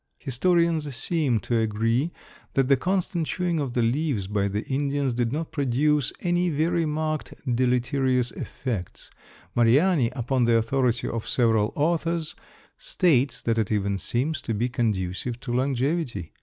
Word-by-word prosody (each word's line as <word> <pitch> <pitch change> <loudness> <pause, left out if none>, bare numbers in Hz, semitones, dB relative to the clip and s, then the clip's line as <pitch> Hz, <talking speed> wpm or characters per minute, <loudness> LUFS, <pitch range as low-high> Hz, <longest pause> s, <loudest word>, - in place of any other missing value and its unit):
Historians 160 +1 +1
seem 135 -4 0
to 120 -2 0
agree 115 +7 0 0.4
that 135 -1 +3
the 140 - +5
constant 175 +1 -1
chewing 175 -3 -1
of 135 -4 -2
the 120 - +1
leaves 125 -3 0
by 100 0 0
the 105 +2 -2
Indians 140 -1 0
did 120 -1 0
not 155 +3 -3
produce 145 +1 +1
any 175 0 +1
very 165 +2 +1
marked 155 0 -2 0.2
deleterious 125 0 +1
effects. 115 -10 -5 0.4
Mariani, 130 +4 +4
upon 125 0 +1
the 115 -1 +4
authority 120 0 +1
of 115 -1 -4
several 110 -3 +2
authors, 165 +1 0 0.5
states 170 - +1
that 115 -1 +1
it 110 -1 -1
even 100 -2 0
seems 140 - -1
to 115 - -3
be 120 +4 0
conducive 110 0 -2
to 120 -3 -4
longevity. 130 - -1
130 Hz, 140 wpm, -25 LUFS, 115-155 Hz, 0.5 s, the